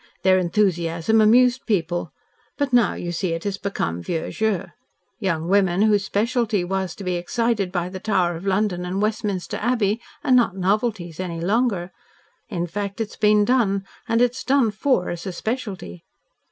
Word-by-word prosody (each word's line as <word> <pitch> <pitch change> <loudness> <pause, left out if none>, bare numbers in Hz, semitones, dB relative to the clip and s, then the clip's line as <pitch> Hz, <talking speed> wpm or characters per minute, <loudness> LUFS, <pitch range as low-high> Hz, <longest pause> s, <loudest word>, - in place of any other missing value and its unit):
Their 185 0 +5
enthusiasm 175 +1 +1
amused 245 +4 +4
people, 175 -5 -1 0.5
but 285 -3 -1
now, 240 -3 +4
you 175 - -4
see, 175 0 -1
it 165 - -4
has 200 -1 -3
become 85 - -2
vieux 165 - -3
jeu. 220 -4 -1 0.5
Young 170 -6 -1
women, 190 0 +3
whose 210 -2 +3
specialty 220 -1 0
was 190 -1 -2
to 200 - -9
be 180 -1 -1
excited 210 +1 -1
by 175 -1 -1
the 185 +1 -7
Tower 185 -4 +1
of 175 +4 -7
London 190 -2 +1
and 180 +2 -3
Westminster 210 -3 -1
Abbey, 225 -2 0 0.2
are - - 0
not 240 -6 +4
novelties 190 -3 -1
any 175 -3 -4
longer. 195 -1 0 0.6
In 175 -6 -2
fact, 200 +4 -4
it's 225 -1 -3
been 210 -1 +4
done, 205 -5 +2 0.2
and 230 +1 +3
it's 250 +2 0
done 265 -5 +3
FOR 215 -3 +1
as 175 +3 -6
a - - -2
specialty.' 195 - -5
200 Hz, 165 wpm, -23 LUFS, 175-220 Hz, 0.6 s, Their